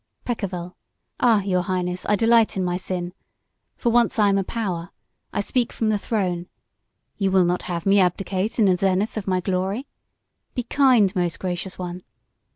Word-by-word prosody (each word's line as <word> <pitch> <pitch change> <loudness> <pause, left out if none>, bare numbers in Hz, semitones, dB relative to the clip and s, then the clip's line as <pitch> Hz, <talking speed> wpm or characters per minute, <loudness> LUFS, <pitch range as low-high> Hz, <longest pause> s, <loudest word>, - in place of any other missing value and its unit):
"Peccavi. 185 -7 -4 0.5
Ah, 225 -5 +4
Your 185 -2 +1
Highness, 180 0 -2
I 210 - +4
delight 225 0 +3
in 190 - 0
my 175 0 0
sin. 180 -1 -4 0.6
For 235 - +1
once 235 0 +3
I 210 -2 +4
am 195 0 +2
a - - 0
power; 185 -5 -3 0.4
I - - -1
speak 240 +3 0
from 225 - -1
the 210 -1 +1
throne. 180 -6 -2 0.7
You 195 -2 +1
will 190 -1 +4
not 180 +1 0
have 170 -1 -3
me 200 +1 +5
abdicate 190 +3 0
in 220 - +4
the 185 -2 +4
zenith 195 +3 0
of 215 -3 -4
my 185 -1 +1
glory? 190 +7 -1 0.7
Be 245 - -1
kind, 240 -6 +3
most 175 -3 -1
gracious 180 0 -4
one. 180 0 -5
190 Hz, 175 wpm, -23 LUFS, 180-215 Hz, 0.7 s, me